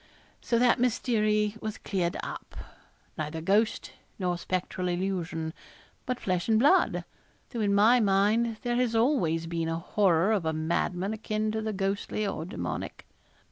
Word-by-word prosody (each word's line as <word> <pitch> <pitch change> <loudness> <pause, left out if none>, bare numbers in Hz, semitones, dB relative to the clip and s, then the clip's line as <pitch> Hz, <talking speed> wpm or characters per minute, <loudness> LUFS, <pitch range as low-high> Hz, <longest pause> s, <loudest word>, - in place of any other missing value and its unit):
So 235 - +1
that 245 +1 +4
mystery 215 -4 +1
was 215 -1 -4
cleared 180 -4 -2
up. - - -7 0.6
Neither 155 +1 -3
ghost 205 +6 +1 0.3
nor 180 -2 0
spectral 180 +1 -3
illusion, 175 -3 -2 0.5
but 250 -1 -1
flesh 180 +1 -1
and 220 - +5
blood 290 +11 +3 0.5
though 235 - -4
in 200 -1 +2
my 225 +5 +6
mind 215 +3 +2
there 240 0 0
has 245 -2 +1
always 225 - +2
been 165 -1 -2
a 165 - -1
horror 185 +1 +2
of 205 -5 +1
a 160 0 0
madman 175 +5 -1
akin 215 0 -2
to 220 0 -2
the 220 0 -2
ghostly 200 +1 -2
or 160 -5 -3
demoniac. 185 - -5
200 Hz, 150 wpm, -28 LUFS, 175-220 Hz, 0.6 s, my